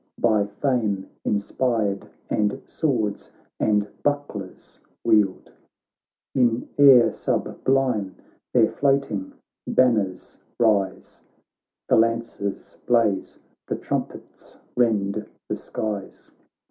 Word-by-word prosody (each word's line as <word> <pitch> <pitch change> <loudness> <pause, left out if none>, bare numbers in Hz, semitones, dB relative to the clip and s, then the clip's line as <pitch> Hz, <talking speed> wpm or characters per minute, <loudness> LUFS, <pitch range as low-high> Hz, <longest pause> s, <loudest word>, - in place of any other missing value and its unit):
By 110 -3 +2
fame 105 -3 -1 0.2
inspired, 105 -1 -1 0.2
and 105 -1 0
swords 115 -10 -1 0.3
and 105 -1 +2
buck 145 0 0
lers 95 -3 -10 0.2
wield; 105 -4 +2 0.8
In 120 -3 +2
air 135 -4 +8
sublime 125 -8 0 0.4
their - - +5
floating 135 -9 0 0.3
banners 110 -7 +1 0.2
rise. 105 -5 +1 0.7
The - - +4
lances 115 -3 -1
blaze, 115 -5 +2 0.3
the - - -1
trumpets - - -6 0.2
rend 105 -4 +1 0.2
the - - -2
skies. 105 -3 -6
110 Hz, 85 wpm, -24 LUFS, 100-125 Hz, 0.8 s, air